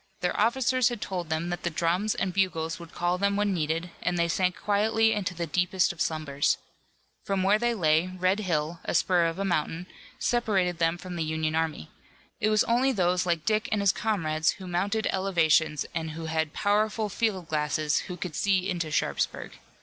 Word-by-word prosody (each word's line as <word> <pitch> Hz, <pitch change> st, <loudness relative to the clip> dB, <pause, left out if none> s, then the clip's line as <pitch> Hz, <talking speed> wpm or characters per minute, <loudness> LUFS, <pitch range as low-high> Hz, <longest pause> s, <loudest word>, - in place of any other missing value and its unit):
Their 180 Hz, -, -1 dB
officers 255 Hz, +3 st, +3 dB
had 240 Hz, -, -5 dB
told 180 Hz, -5 st, -4 dB
them 160 Hz, +2 st, -1 dB
that 175 Hz, -, -3 dB
the 170 Hz, -, -1 dB
drums 175 Hz, +6 st, 0 dB
and 185 Hz, -2 st, -1 dB
bugles 165 Hz, -4 st, 0 dB
would 170 Hz, -1 st, -11 dB
call 175 Hz, +1 st, -1 dB
them 200 Hz, +1 st, +1 dB
when 205 Hz, -1 st, +1 dB
needed, 165 Hz, +1 st, -2 dB
and 180 Hz, -1 st, -1 dB
they 170 Hz, 0 st, +2 dB
sank 180 Hz, +2 st, +1 dB
quietly 220 Hz, +2 st, +2 dB
into 190 Hz, -4 st, -2 dB
the 170 Hz, 0 st, -2 dB
deepest 180 Hz, +3 st, +1 dB
of 170 Hz, -, -8 dB
slumbers. 150 Hz, -3 st, 0 dB, 0.7 s
From 195 Hz, -1 st, -1 dB
where 200 Hz, +3 st, +4 dB
they 240 Hz, 0 st, +1 dB
lay 160 Hz, -2 st, +2 dB
Red 185 Hz, +2 st, 0 dB
Hill, 165 Hz, -4 st, -1 dB
a -, -, -2 dB
spur 175 Hz, -2 st, +3 dB
of 165 Hz, +1 st, -3 dB
a 195 Hz, -, -2 dB
mountain, 165 Hz, -1 st, -1 dB, 0.3 s
separated 195 Hz, -8 st, 0 dB
them 165 Hz, 0 st, +2 dB
from 180 Hz, 0 st, -7 dB
the 165 Hz, -, 0 dB
Union 155 Hz, 0 st, -1 dB
army. 160 Hz, -, -2 dB, 0.5 s
It 215 Hz, -, +2 dB
was 215 Hz, 0 st, +4 dB
only 250 Hz, +3 st, +2 dB
those 180 Hz, -4 st, +1 dB
like 170 Hz, -2 st, 0 dB
Dick 215 Hz, 0 st, +1 dB
and 215 Hz, -, +1 dB
his 200 Hz, -2 st, +4 dB
comrades 165 Hz, -7 st, 0 dB
who 190 Hz, -, -10 dB
mounted 200 Hz, +5 st, -1 dB
elevations 160 Hz, -5 st, +2 dB
and 160 Hz, -1 st, -3 dB
who 160 Hz, +1 st, -6 dB
had 160 Hz, -1 st, -1 dB
powerful 215 Hz, +3 st, +1 dB
field 205 Hz, -4 st, -1 dB
glasses 150 Hz, 0 st, 0 dB
who 180 Hz, -2 st, -6 dB
could 175 Hz, -3 st, -5 dB
see 190 Hz, -2 st, +1 dB
into 175 Hz, -4 st, -2 dB
Sharpsburg. 150 Hz, -, -2 dB
180 Hz, 195 wpm, -27 LUFS, 160-200 Hz, 0.7 s, where